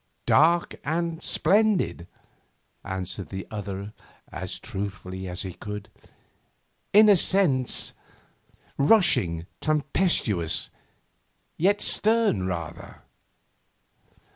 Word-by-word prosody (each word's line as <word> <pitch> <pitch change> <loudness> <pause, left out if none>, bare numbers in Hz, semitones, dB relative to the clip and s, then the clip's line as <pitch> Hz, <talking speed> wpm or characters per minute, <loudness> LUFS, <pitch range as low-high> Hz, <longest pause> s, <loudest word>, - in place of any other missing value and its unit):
'Dark 170 +2 +3
and 165 +2 -2
splendid,' 195 - +1 0.8
answered 95 0 -5
the 95 -1 -6
other 100 -1 -6 0.4
as - - -5
truthfully 95 -1 -6
as 90 +2 -3
he 95 -2 -6
could. 105 +2 -8 1.0
'In 215 +2 +7
a 205 - +7
certain 165 -9 +3
sense, - - +1 0.9
rushing, 140 - +3
tempestuous, 150 - 0 0.8
yet 200 +5 +1
stern 215 - +3
rather. 85 -2 -7
110 Hz, 85 wpm, -25 LUFS, -, 1.0 s, In